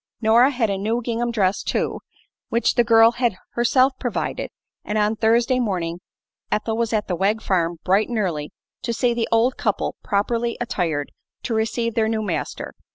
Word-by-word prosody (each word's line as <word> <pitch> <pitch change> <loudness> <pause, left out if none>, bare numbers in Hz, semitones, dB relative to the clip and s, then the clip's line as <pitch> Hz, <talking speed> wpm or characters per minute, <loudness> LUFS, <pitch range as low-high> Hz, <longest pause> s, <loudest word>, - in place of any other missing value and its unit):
Nora 235 +3 +5
had 240 -6 0
a 195 - -2
new 220 +4 0
gingham 235 +1 -1
dress, 200 -4 +1
too, - - -1 0.5
which 235 +1 +2
the 240 - +3
girl 225 -1 +6
had 240 -4 0 0.2
herself 255 +3 +3
provided, 245 -4 -3 0.3
and 210 - -2
on 210 +1 +2
Thursday 235 +3 +2
morning 175 -7 -2 0.5
Ethel 220 +1 0
was 230 -1 -1
at 215 -2 0
the 180 - -1
Wegg 200 +5 +1
farm 175 -5 0
bright 195 +5 +2
and 240 - -2
early 165 -8 -2 0.3
to 235 - -2
see 240 +1 +1
the 235 -1 -1
old 230 +3 +3
couple 210 -3 -1
properly 230 +4 0
attired 165 -11 -2 0.3
to 235 - -2
receive 225 +1 -1
their 220 0 +1
new 220 -1 -1
master. 180 -6 -4
225 Hz, 175 wpm, -22 LUFS, 200-235 Hz, 0.5 s, girl